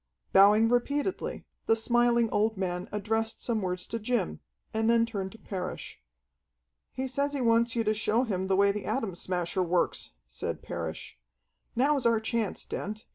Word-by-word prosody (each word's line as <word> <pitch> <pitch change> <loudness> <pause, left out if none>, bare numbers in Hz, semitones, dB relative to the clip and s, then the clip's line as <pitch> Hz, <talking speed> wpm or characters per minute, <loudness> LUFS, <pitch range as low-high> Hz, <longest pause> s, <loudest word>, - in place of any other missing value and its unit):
Bowing 210 +3 +7
repeatedly, 285 +9 -1 0.2
the 225 - +5
smiling 235 +1 +3
old 215 0 +1
man 180 -1 -3
addressed 220 +2 -1
some 225 -3 -1
words 180 -1 -2
to 230 - -3
Jim, 215 - -1 0.3
and 220 +1 +1
then 230 0 +4
turned 200 -4 -4
to - - -12
Parrish. 185 - -6 0.9
"He 265 +1 -3
says 280 +2 -1
he 280 - -2
wants 230 0 +3
you 230 - +1
to 215 0 +2
show 225 +2 +1
him 190 -6 -2
the 190 - +2
way 200 +1 +5
the 205 0 -5
Atom 220 -3 -1
Smasher 180 +1 -2
works," 175 - 0
said - - -5
Parrish. - - -6 0.6
"Now's 270 0 +3
our 230 -1 +3
chance, 220 -2 -2
Dent. 215 +3 -5
220 Hz, 165 wpm, -29 LUFS, 190-235 Hz, 0.9 s, Bowing